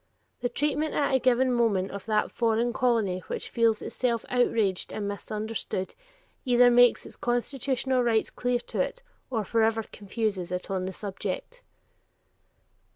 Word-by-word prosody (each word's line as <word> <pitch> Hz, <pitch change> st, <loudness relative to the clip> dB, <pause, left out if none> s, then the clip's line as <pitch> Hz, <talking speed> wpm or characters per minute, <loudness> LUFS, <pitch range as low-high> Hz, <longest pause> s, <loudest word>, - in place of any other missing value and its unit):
The 245 Hz, -, -1 dB
treatment 295 Hz, +4 st, -1 dB
at 285 Hz, -2 st, +1 dB
a 265 Hz, -, +4 dB
given 255 Hz, 0 st, +3 dB
moment 210 Hz, -6 st, +1 dB
of 200 Hz, +2 st, -8 dB
that 215 Hz, -1 st, +1 dB
foreign 230 Hz, 0 st, +1 dB
colony 225 Hz, -8 st, +1 dB
which -, -, -5 dB
feels 230 Hz, -2 st, +2 dB
itself 235 Hz, -3 st, -1 dB
outraged 225 Hz, -6 st, +1 dB
and 205 Hz, -1 st, -3 dB
misunderstood, 210 Hz, -1 st, -4 dB, 0.5 s
either 245 Hz, -1 st, +5 dB
makes 245 Hz, 0 st, +5 dB
its -, -, -10 dB
constitutional 255 Hz, +1 st, 0 dB
rights 230 Hz, -2 st, +1 dB
clear 245 Hz, 0 st, 0 dB
to -, -, -2 dB
it, -, -, -3 dB, 0.3 s
or 225 Hz, -5 st, -1 dB
forever 225 Hz, +1 st, +2 dB
confuses 200 Hz, -3 st, -3 dB
it 180 Hz, +2 st, -4 dB
on 185 Hz, -1 st, -1 dB
the 190 Hz, -, -4 dB
subject. 485 Hz, -, -5 dB
230 Hz, 145 wpm, -27 LUFS, 210-250 Hz, 0.5 s, either